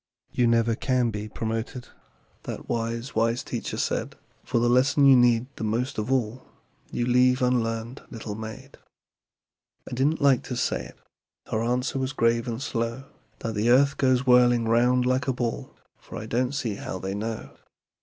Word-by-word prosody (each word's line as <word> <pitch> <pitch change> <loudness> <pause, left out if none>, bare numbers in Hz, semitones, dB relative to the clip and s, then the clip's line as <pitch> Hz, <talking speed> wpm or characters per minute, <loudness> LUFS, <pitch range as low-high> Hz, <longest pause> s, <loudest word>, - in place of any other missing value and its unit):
"You 125 - +2
never 115 0 +3
can 125 0 0
be 105 0 -5
promoted," 115 +3 -4 0.6
That - - -6
wise, 115 +3 -3
wise 115 +2 +1
teacher - - -4
said, - - -2 0.3
"For 125 - -1
the 120 +1 +3
lesson 135 +4 +4
you 135 -1 +8
need 120 -1 +4
the - - -5
most 115 +3 -1
of 110 +4 -3
all 125 -1 -1 0.4
You 120 - -1
leave 125 +1 +3
unlearned, 115 0 -1
little 115 -3 -6
maid." 110 +1 -9 1.1
"I - - -7
didn't 140 +6 +1
like 140 -3 +4
to 125 - -4
say 130 - -1
it" - - -14 0.5
Her 110 - 0
answer 125 +3 -1
was 130 0 -2
grave, 115 -1 +1
and 115 -1 -3
slow 115 -1 -3 0.4
"That 115 - -3
the 110 +3 0
earth 140 +3 +4
goes 130 -1 +2
whirling 120 -2 +5
'round 125 +2 +3
like 130 +2 +1
a 135 - +2
ball, 120 -2 -4 0.2
For - - -10
I 110 - -6
don't 125 +4 -1
see 115 -7 -2
how - - -5
they 95 +1 -4
know. 110 +2 -5
120 Hz, 175 wpm, -26 LUFS, 115-130 Hz, 1.1 s, you